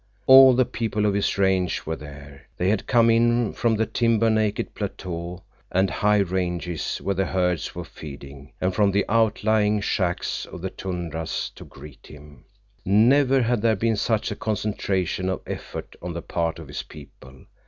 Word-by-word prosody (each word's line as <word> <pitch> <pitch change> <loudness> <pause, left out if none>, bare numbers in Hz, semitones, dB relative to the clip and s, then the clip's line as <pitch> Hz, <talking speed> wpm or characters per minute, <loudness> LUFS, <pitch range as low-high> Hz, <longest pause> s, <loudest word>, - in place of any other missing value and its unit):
All 130 -1 +9
the 130 0 +3
people 110 -3 -2
of 105 - +2
his 100 0 0
range 95 -2 +1
were 80 - -2
there. 70 -2 -12
They 90 - +1
had 105 -1 -1
come 115 -2 +4
in 120 0 +2
from 115 -1 +1
the 110 +1 +1
timber 115 -1 +2
naked 110 -1 0
plateaux 90 -3 -6 0.3
and 95 0 +2
high 105 +3 +2
ranges 90 -3 -2
where 100 - -2
the 95 0 -1
herds 90 -3 -1
were - - -5
feeding, 70 -1 -11
and 95 0 0
from 100 +2 +3
the 100 +1 +1
outlying 110 -1 +2
shacks 90 -3 -2
of 90 - -10
the 95 - -3
tundras 85 -4 -4
to - - -12
greet 75 -3 -14
him. 75 -3 -15 0.4
Never 130 +6 +4
had 120 -1 0
there 115 -1 +3
been 115 +2 0
such 110 +1 0
a - - -3
concentration 95 -4 -2
of 95 - -3
effort - - -7
on 90 0 -5
the 85 -1 -6
part 85 -1 -2
of 80 -2 -10
his 70 - -5
people. 65 0 -15
95 Hz, 175 wpm, -24 LUFS, 85-110 Hz, 0.4 s, All